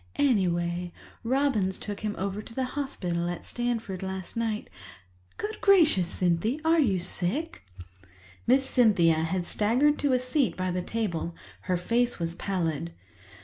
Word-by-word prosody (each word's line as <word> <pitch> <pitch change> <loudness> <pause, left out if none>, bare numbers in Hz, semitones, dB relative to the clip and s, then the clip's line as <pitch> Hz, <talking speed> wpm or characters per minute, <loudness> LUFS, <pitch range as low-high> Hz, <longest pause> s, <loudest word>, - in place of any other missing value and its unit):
Anyway, 175 -7 +1 0.3
Robins 235 -7 +1
took 205 -1 -6
him 210 -1 -3
over 200 +2 -3
to 230 - -13
the 265 - 0
hospital 175 -12 -2
at 175 - -5
Stanford 230 -6 -3
last 190 -1 -5
night—good 95 - -6
gracious, 325 - +5
Cynthy, 180 - +1
are 330 +1 +4
you 215 -11 +3
sick?" 185 - -2 0.9
Miss 265 +3 +4
Cynthia 205 -11 +4
had 165 +3 -1
staggered 250 +11 +2
to 285 -2 +2
a 250 - +3
seat 255 +1 0
by 185 0 -1
the 180 0 -1
table; 175 -5 -3 0.3
her 180 - +1
face 240 +7 +1
was 170 -1 -2
pallid. 165 - -2
195 Hz, 140 wpm, -27 LUFS, 175-245 Hz, 0.9 s, gracious